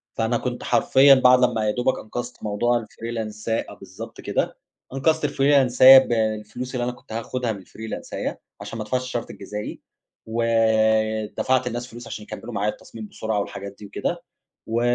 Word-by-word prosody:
فأنا 115 Hz, +1 st, +1 dB
كنت 125 Hz, 0 st, -4 dB
حرفيًا 135 Hz, +3 st, +5 dB
بعد 125 Hz, -1 st, +6 dB
لما 115 Hz, -3 st, +2 dB
يادوبك 125 Hz, +5 st, 0 dB
أنقذت 120 Hz, +3 st, -7 dB
موضوع 120 Hz, +3 st, +1 dB
الfreelance 110 Hz, -2 st, -6 dB
أ 115 Hz, -, -1 dB
بالضبط -, -, -10 dB
كده، -, -, -2 dB, 0.4 s
أنقذت 155 Hz, +4 st, +1 dB
الفريلانساية 135 Hz, -2 st, +7 dB
بالفلوس 110 Hz, +1 st, -2 dB
اللي 120 Hz, -, -1 dB
أنا 125 Hz, -, -1 dB
كنت 115 Hz, -, -18 dB
هاخدها 115 Hz, +1 st, -2 dB
من 100 Hz, -, -6 dB
الفريلانساية 110 Hz, +4 st, -6 dB, 0.2 s
عشان 115 Hz, -, -7 dB
ما -, -, -2 dB
ادفعش 125 Hz, +4 st, -1 dB
الشرط 120 Hz, -2 st, -4 dB
الجزائي، 105 Hz, +1 st, -7 dB, 0.4 s
ودفعت 110 Hz, +1 st, +1 dB
للناس 120 Hz, +1 st, -4 dB
فلوس 120 Hz, -1 st, -10 dB
عشان 105 Hz, -, -7 dB
يكمّلوا 120 Hz, -, -8 dB
معايا 105 Hz, +1 st, 0 dB
التصميم 110 Hz, -2 st, -10 dB
بسرعة 110 Hz, -1 st, -2 dB
والحاجات 100 Hz, 0 st, -6 dB
دي 105 Hz, -, -9 dB
وكده، 100 Hz, -, -3 dB, 0.4 s
و 115 Hz, +1 st, 0 dB
115 Hz, 155 wpm, -23 LUFS, 110-125 Hz, 0.4 s, الفريلانساية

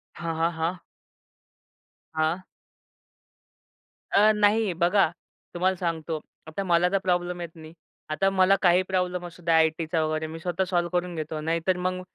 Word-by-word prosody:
हां, 165 Hz, -1 st, -4 dB
हां. 165 Hz, +1 st, +2 dB
हां. 165 Hz, +2 st, -1 dB, 1.3 s
हां. 160 Hz, +4 st, +1 dB, 1.7 s
अ, 210 Hz, +2 st, +6 dB
नाही. 210 Hz, -1 st, +3 dB
बघा, 175 Hz, +1 st, +3 dB, 0.4 s
तुम्हाला 185 Hz, +2 st, +1 dB
सांगतो, 165 Hz, -2 st, -3 dB, 0.3 s
आता 175 Hz, +5 st, -4 dB
मला 175 Hz, -1 st, +3 dB
तर 195 Hz, -, +3 dB
प्रॉब्लेम 175 Hz, -1 st, 0 dB
येत 170 Hz, -, -5 dB
नाही. 160 Hz, 0 st, -12 dB, 0.4 s
आता 195 Hz, +6 st, +2 dB
मला 195 Hz, 0 st, +4 dB
काही 180 Hz, 0 st, +5 dB
प्रॉब्लेम 180 Hz, -1 st, -1 dB
असू 175 Hz, 0 st, -11 dB
द्या, 165 Hz, -1 st, +3 dB
आयटीचा 160 Hz, 0 st, +1 dB
वगैरे 155 Hz, 0 st, -1 dB
मी 165 Hz, +1 st, -8 dB
स्वतः 175 Hz, +2 st, -1 dB
सॉल्व्ह 175 Hz, -1 st, +1 dB
करून 175 Hz, -1 st, -7 dB
घेतो. 155 Hz, 0 st, -4 dB
नाहीतर 165 Hz, +3 st, 0 dB
मग 185 Hz, 0 st, -2 dB
175 Hz, 150 wpm, -26 LUFS, 160-185 Hz, 1.7 s, अ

